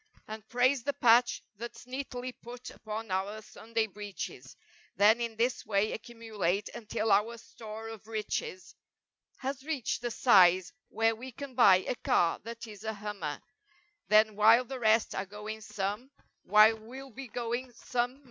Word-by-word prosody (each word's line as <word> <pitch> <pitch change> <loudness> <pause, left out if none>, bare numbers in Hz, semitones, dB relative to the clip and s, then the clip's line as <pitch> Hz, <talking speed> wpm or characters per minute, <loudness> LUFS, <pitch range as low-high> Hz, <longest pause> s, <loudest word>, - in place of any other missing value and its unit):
And 215 0 -7
praise 255 +2 +3
the 285 +4 -1
patch 240 0 +4
that's 235 +2 -8
neatly 255 -1 -5
put 245 +1 -10
upon 215 -1 -6
our 195 +3 -2
Sunday 225 +1 -2
breeches 195 - -8 0.4
Then 215 +4 +5
in 230 -1 -3
this 240 +3 0
way 205 +1 +1
accumulate 220 -5 -3
until 220 -1 -2
our 215 +4 +3
store 220 -1 -9
of 220 -1 -10
riches 210 -4 -4 0.6
Has 270 0 -4
reached 285 -7 -2
the 240 - -2
size 185 -8 +5 0.2
where 225 0 +1
we 255 +4 -9
can 275 +2 -8
buy 195 -7 +6
a - - +1
car 170 -8 +1
that 230 0 -7
is 210 -2 -11
a 220 0 -2
hummer, 200 -8 -5 0.7
Then 215 0 +5
while 225 +4 +6
the 260 +1 -6
rest 220 -1 +3
are 190 +1 -3
going 210 +2 -7
some, 210 +4 -4 0.4
while 215 +2 +6
we'll 260 +5 -10
be 265 +3 -8
going 240 +2 -3
some'er. 245 +2 -2
225 Hz, 155 wpm, -30 LUFS, 210-245 Hz, 0.7 s, buy